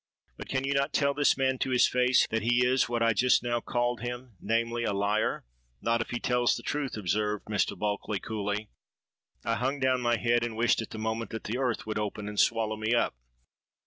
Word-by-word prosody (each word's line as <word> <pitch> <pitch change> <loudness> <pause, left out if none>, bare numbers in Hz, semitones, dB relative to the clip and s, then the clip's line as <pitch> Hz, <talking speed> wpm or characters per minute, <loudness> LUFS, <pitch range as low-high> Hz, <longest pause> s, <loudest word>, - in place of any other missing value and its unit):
But - - -9
can 135 0 -1
you 140 +1 0
not 140 +1 0
tell 140 -1 +2
this 145 -1 +3
man 130 -1 +1
to - - -1
his 125 -1 +4
face 125 0 +3
that 115 0 0
he 120 +3 +3
is 125 -1 +2
what 120 -1 0
I 115 -1 +4
just 125 +4 +3
now 120 -1 0
called 120 0 -1
him; 120 -1 -6
namely, 115 +2 0
a 105 - 0
liar?'—'Not 100 - -1
if - - -5
he 120 - -3
tells 125 0 +2
the 120 - -9
truth,' 140 -4 -2
observed 105 +2 -1
Mr. 105 -1 -1
Bulkeley 105 -1 -2
coolly.—I 105 +1 -6
hung 135 +3 -1
down 130 -1 +2
my 120 -1 +2
head, 120 0 +2
and 115 -2 -4
wished 115 0 +3
at 115 - -7
the - - -8
moment 110 +1 -2
that 115 - -6
the 120 +4 -3
earth 125 -4 -1
would 110 0 -2
open 105 0 -4
and 105 -1 -4
swallow 110 -2 +2
me 110 +2 +1
up. 120 - +1
115 Hz, 210 wpm, -29 LUFS, 110-125 Hz, -, his